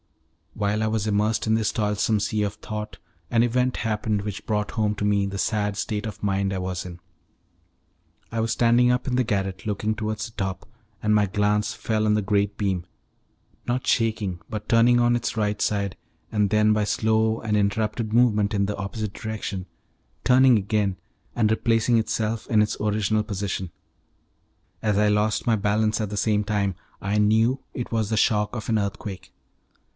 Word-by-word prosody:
While 105 +1 0
I - - +1
was 110 -1 -1
immersed 105 +1 +1
in 110 - +3
this 110 -1 +1
toilsome 105 0 +1
sea 105 +1 -1
of 100 0 -2
thought, 105 0 -6 0.3
an 115 - +3
event 125 +1 +1
happened 105 -2 -1
which 105 -1 -6
brought 105 -1 -1
home 105 -1 0
to 105 - -2
me 100 -1 +2
the 100 0 -4
sad 105 +1 0
state 105 +1 -2
of 105 -1 -7
mind 100 -1 0
I 95 - -2
was 90 -1 -3
in. 90 -1 -8 1.3
I 115 - -2
was 115 0 0
standing 120 +1 +4
up 125 +1 -1
in 125 - 0
the 130 - +3
garret 95 -4 -2
looking 105 +1 -1
towards 110 0 -3
the - - -9
top, 95 -2 -4 0.3
and 105 0 +2
my 105 -1 +3
glance 105 +1 +1
fell 110 -1 -1
on 105 0 +3
the 105 - +1
great 100 0 0
beam, 95 -4 -1 0.8
not 125 +2 -1
shaking 110 -6 +1
but 105 -1 -5
turning 120 +1 +5
on 120 0 +3
its 120 -1 -2
right 105 -1 0
side, 100 -2 0 0.4
and 105 -2 +2
then, 105 +1 +4
by 105 0 +1
slow 110 +1 +1
and 105 -1 -1
interrupted 105 +2 0
movement 110 -3 +3
in 100 0 +2
the 105 +1 -2
opposite 100 +1 -4
direction, 105 -4 -5 0.6
turning 130 -1 +6
again 100 -1 0 0.4
and 110 -3 +2
replacing 115 +1 +2
itself 110 0 -1
in 110 -2 +3
its 105 0 0
original 105 0 +1
position. 100 -4 -3 1.1
As 105 -2 +1
I 105 0 +4
lost 105 +2 +1
my 115 - +4
balance 110 +2 +1
at 105 - -2
the 105 - -4
same 105 0 +2
time, 100 -3 -1 0.3
I 100 +2 0
knew 110 +5 +3
it 120 - -5
was 110 -3 0
the 110 - 0
shock 105 +1 +2
of 110 - -5
an 110 - +2
earthquake. 100 -1 -5
105 Hz, 180 wpm, -24 LUFS, 100-110 Hz, 1.3 s, turning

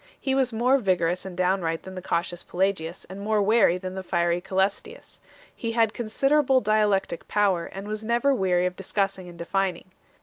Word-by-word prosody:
He 265 - -1
was 265 -2 +2
more 250 +4 +3
vigorous 180 -4 0
and 180 - -9
downright 180 -3 0
than 190 - -9
the 185 - -6
cautious 175 -1 -2
Pelagius 180 -2 -2
and 190 +2 -8
more 215 +1 +1
wary 205 -3 +4
than 185 0 -6
the 190 - -5
fiery 175 -1 0
Cselestius 190 +2 -2
1. - - -30 0.3
He 230 - -3
had 225 -2 +2
considerable 270 +4 +2
dialectic 205 -5 +1
power, 195 -5 +1
and 195 +1 -8
was 215 +1 -4
never 235 +5 +2
weary 180 -6 +1
of 180 0 -2
discussing 195 -1 -2
and 170 - -12
defining. 185 +1 -2
195 Hz, 180 wpm, -25 LUFS, 180-215 Hz, 0.3 s, wary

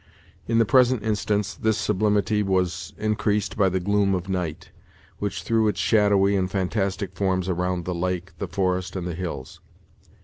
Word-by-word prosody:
In 115 - +1
the 115 - +5
present 125 -1 +4
instance, 105 -1 0
this 110 -1 0
sublimity 105 0 +1
was 95 -3 -1
increased 105 -1 0
by 100 -2 +3
the 95 +1 0
gloom 100 +1 +2
of 90 0 -4
night, 90 -5 -3 0.5
which 100 -1 -3
threw 110 -1 +2
its 105 - -1
shadowy 100 -2 +3
and 95 -1 0
fantastic 95 0 -1
forms 95 -1 0
around 90 -1 -1
the 90 - -2
lake, 90 +1 -2
the 100 - -3
forest, 90 +1 -1
and 90 -2 -3
the 90 - -3
hills. 80 -7 -6
95 Hz, 165 wpm, -24 LUFS, 90-105 Hz, 0.5 s, the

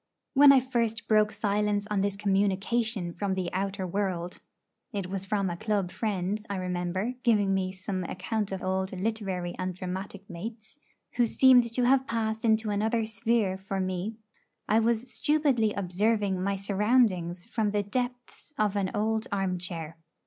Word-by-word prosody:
When 285 0 +8
I 275 - +7
first 235 -3 -1
broke 215 -1 +4
silence 205 0 0
on 200 -2 +2
this 200 0 0
communication 200 0 0
from 195 0 -2
the 185 -2 -3
outer 195 0 -2
world 180 -2 -2 0.5
it 200 -4 -3
was 190 +1 -4
from 200 0 0
a 175 - -2
club 200 -1 -1
friend, 205 -1 -2
I 200 - -2
remember, 185 +4 -2
giving 210 -6 +3
me 190 -1 0
some 185 0 -4
account 205 +4 -3
of 190 -1 -4
old 190 0 -1
literary 190 -4 -2
and 185 -1 -2
dramatic 190 +2 -6
mates, 220 +9 -8 0.4
who 240 -1 +4
seemed 245 -1 +5
to 245 +2 0
have 265 +1 +3
passed 220 -1 -1
into 220 -1 +2
another 220 +2 +1
sphere 220 -3 0
for 195 0 -4
me 185 +3 -2 0.5
I 220 - +4
was 235 +2 0
stupidly 285 -8 +2
observing 200 +1 0
my 200 +1 0
surroundings 195 -3 +1
from 220 -2 -1
the 205 0 0
depths 245 +6 -5
of 210 -1 +1
an 195 -2 0
old 220 +1 0
armchair. 180 -4 -3
205 Hz, 155 wpm, -28 LUFS, 190-225 Hz, 0.5 s, When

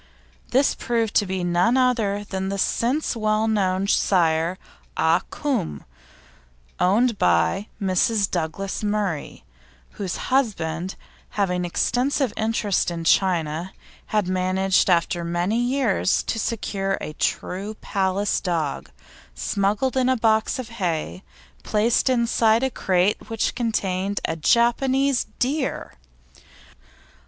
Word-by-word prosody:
This 270 +3 +3
proved 230 -3 -1
to 205 - +2
be 185 -1 -2
none 175 +8 +2
other 225 -6 +1
than 190 -1 -4
the 200 - -2
since 250 +9 0
well 215 0 +1
known 195 -3 +1
sire 170 -3 +2 0.4
Ah 165 +2 +3
Cum, 250 - -2 1.0
owned 215 +4 +2
by 90 - +2
Mrs. 200 +2 +2
Douglas 180 +5 -3
Murray, 205 - -2 0.5
whose 190 -4 -4 0.2
husband, 185 - 0 0.4
having 180 -3 +1
extensive 250 - 0
interests 220 -4 0
in 170 -1 -5
China, 170 -1 +1 0.3
had 210 -3 0
managed 185 +1 +1
after 170 0 +1
many 175 +6 0
years 245 -6 +1
to 225 - -2
secure 195 -4 -2
a 155 - -6
true 195 +6 -2
Palace 195 0 -1
dog, 165 -6 -2 0.5
smuggled 200 - 0
in 260 -1 +2
a 260 - +2
box 220 +2 +2
of 255 -3 -6
hay, 155 - -2 0.4
placed 225 +5 +1
inside 235 -2 +2
a 265 - 0
crate 190 -1 0
which 225 -1 -1
contained 200 -4 -1 0.2
Japanese 260 - +2
deer! 270 +2 -2
200 Hz, 110 wpm, -23 LUFS, 180-230 Hz, 1.0 s, This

